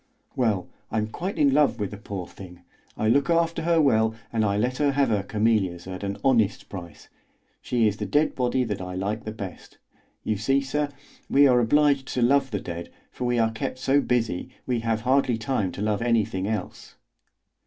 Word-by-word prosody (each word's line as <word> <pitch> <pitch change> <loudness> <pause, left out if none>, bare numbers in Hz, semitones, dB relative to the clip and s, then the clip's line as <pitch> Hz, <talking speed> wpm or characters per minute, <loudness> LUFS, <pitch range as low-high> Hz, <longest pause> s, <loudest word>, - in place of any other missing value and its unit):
Well, 110 -9 0 0.2
I'm 110 -1 -1
quite 180 - -4
in 145 -3 +4
love 145 -5 +3
with 100 -2 -2
the 100 - -7
poor 100 -3 -6
thing; 90 -1 -13 0.3
I 110 - 0
look 140 +7 +3
after 165 -1 +2
her 165 0 +2
well, 110 -7 +3 0.2
and 110 -1 +1
I 100 -1 +1
let 125 +4 0
her 145 -2 +2
have 140 -2 +2
her 105 -3 +1
camellias 100 -4 0
at 95 +1 -7
an 100 0 -3
honest 115 -6 +2
price. 85 -5 -9 0.5
She 120 -3 +1
is 105 0 -1
the - - -4
dead 150 +1 +2
body 125 0 0
that 105 -5 -3
I 90 0 -6
like 100 +4 -3
the 110 - -3
best. 100 -4 -9 0.5
You 110 - -1
see, 135 +7 +2
sir, 145 +2 -1 0.4
we 140 +1 +6
are 125 -3 +5
obliged 140 +3 +3
to 125 - +2
love 135 +2 +3
the 105 -4 -2
dead, 85 -1 -6 0.2
for 125 - -5
we 120 0 +1
are 115 -1 +2
kept 115 +3 -4
so 135 +2 +2
busy, 120 -4 -1 0.2
we 125 -2 0
have 115 -1 -1
hardly 130 -1 +2
time 110 -5 -1
to 100 - -4
love 105 -1 0
anything 110 -5 0
else." 105 -4 -5
115 Hz, 200 wpm, -25 LUFS, 100-135 Hz, 0.5 s, we